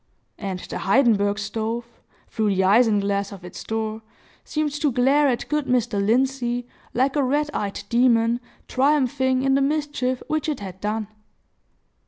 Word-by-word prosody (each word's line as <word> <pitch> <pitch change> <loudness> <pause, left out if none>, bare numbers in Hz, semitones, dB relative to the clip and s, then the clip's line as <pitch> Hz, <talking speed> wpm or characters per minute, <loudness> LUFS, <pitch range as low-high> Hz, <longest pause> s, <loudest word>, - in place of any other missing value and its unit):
And 195 -3 -3
the - - -6
Heidenberg 205 -3 +3
stove, 220 +3 -3 0.4
through 215 -3 0
the 190 - +2
isinglass 200 -1 +3
of 190 -3 -10
its 180 - -8
door, 220 0 -3 0.4
seemed 305 -1 -1
to 295 -3 +2
glare 270 +4 +3
at 245 -3 -1
good 300 -2 -1
Mr. 240 -5 +1
Lindsey, 245 +1 +1 0.3
like 265 +3 +2
a 290 - +3
red 295 +3 0
eyed 200 -1 -3
demon, 235 -1 +3 0.3
triumphing 260 -1 +2
in 270 0 +3
the 275 - +3
mischief 280 -3 -1
which 310 0 -1
it 300 - -2
had 190 -2 -8
done! 215 0 -2
240 Hz, 150 wpm, -23 LUFS, 210-270 Hz, 0.4 s, Heidenberg